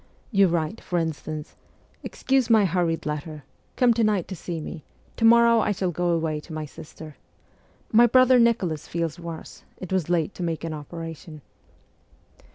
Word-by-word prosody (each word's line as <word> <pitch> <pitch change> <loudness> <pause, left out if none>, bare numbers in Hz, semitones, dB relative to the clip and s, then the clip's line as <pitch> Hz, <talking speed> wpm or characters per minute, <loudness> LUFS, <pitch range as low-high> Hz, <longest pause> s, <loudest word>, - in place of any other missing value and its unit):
You 200 -3 +5
write, 170 +4 -2
for 180 - -3
instance: 155 -2 -4 0.2
' - - -35
Excuse 265 -3 0
my 220 -3 +5
hurried 170 -2 0
letter. 150 0 -5 0.3
Come 245 -2 +4
to 230 0 +1
night 210 -5 +1
to 190 - -5
see 170 -1 -5
me; 155 +1 -8 0.3
to 225 - 0
morrow 235 0 +6
I 215 - +1
shall 185 -2 -1
go 175 +1 -1
away 160 -2 0
to 160 +2 -11
my 155 0 -4
sister. 155 0 -12 0.7
My 235 +2 +6
brother 255 +1 +5
Nicholas 195 -10 +1
feels 165 -1 -3
worse; 170 -2 -9
it 185 0 -6
was 180 -4 0
late 175 +1 0
to - - -9
make 165 -2 -3
an 165 -1 -3
operation.' 160 0 -8
170 Hz, 170 wpm, -24 LUFS, 160-215 Hz, 0.7 s, morrow